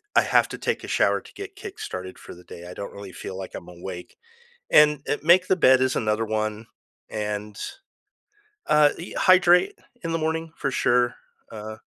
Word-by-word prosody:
I - - +7
have - - +3
to - - -6
take - - -2
a - - -7
shower - - +2
to - - -17
get 400 0 -9
kick 405 0 -9
started 95 - -6
for - - -11
the 90 - -15
day, 85 - -11
I 90 - -8
don't 100 - -7
really 100 -2 -9
feel 95 - -7
like 95 -1 -7
I'm 85 - -9
awake. 90 0 -9 0.5
And, 150 -1 +6
eh, 145 - 0
make 180 +3 +5
the 190 - +3
bed 130 -6 +5
is 130 0 +1
another 110 0 0
one, 110 0 -3 0.4
and, 105 0 -4 1.1
uh, 150 -1 +5
e 170 - -8
hydrate 185 - +5 0.3
in 165 0 -3
the 165 - 0
morning 160 +1 -2
for 135 - -2
sure, 120 -1 +2 0.4
uh 110 0 -7
125 Hz, 190 wpm, -24 LUFS, 105-165 Hz, 1.1 s, I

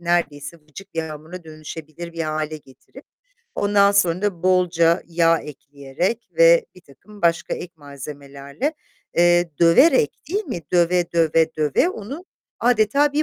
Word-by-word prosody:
neredeyse 170 -3 -2
vıcık 165 +6 -14
bir 165 - -1
hamura 160 +3 -9
dönüşebilir 155 +1 -9
bir 165 -1 -4
hâle 155 0 -3
getirip, 135 -3 -17 0.5
ondan 200 0 +3
sonra 185 -2 +2
da 190 -5 -2
bolca 175 -2 +2
yağ 165 -1 +2
ekleyerek 145 - -5
ve - - +6
birtakım 180 +5 -18
başka 170 -1 +1
ek 180 +1 -8
malzemelerle, 140 - -6 0.4
eee, 175 0 +4
döverek, 275 - +5 0.2
değil 410 +4 -2
mi? 185 - -5
Döve, 175 0 +2
döve, 165 -1 +2
döve 155 - +2
onu 275 - -8 0.4
adeta 245 +5 +2
bir 300 +2 +1
170 Hz, 130 wpm, -21 LUFS, 155-200 Hz, 0.5 s, ve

